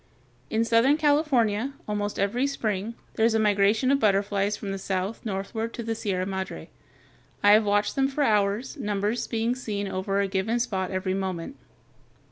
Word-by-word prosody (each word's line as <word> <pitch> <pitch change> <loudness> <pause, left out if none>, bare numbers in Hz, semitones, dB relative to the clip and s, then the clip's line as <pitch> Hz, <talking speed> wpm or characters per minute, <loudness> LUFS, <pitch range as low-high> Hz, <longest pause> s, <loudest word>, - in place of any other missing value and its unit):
] - - -35
In 225 - +3
southern 230 +6 +4
California, 275 -6 +2
almost 205 -1 -2
every 235 +7 +1
spring, 220 -5 -2 0.2
there 220 - +2
is 225 - +1
a - - +3
migration 210 +4 +3
of 280 - +3
butterflies 200 -1 +1
from 200 - -5
the 195 - -4
south 190 +3 -3
northward 220 +2 -4
along 235 - -4
the 225 - -1
Sierra 195 -4 -2
Madre. 190 - -5 0.7
I 205 - +7
have 215 +1 +6
watched 205 0 +1
them 270 -1 +3
for 275 +2 -1
hours, 210 +4 +1
numbers 210 -1 -1
being 230 +1 0
seen 210 -5 -4
over 195 +1 -1
a 200 - +1
given 195 +5 0
spot 190 -6 -1
every 185 0 -2
moment. 190 +4 -3
210 Hz, 175 wpm, -26 LUFS, 195-235 Hz, 0.7 s, I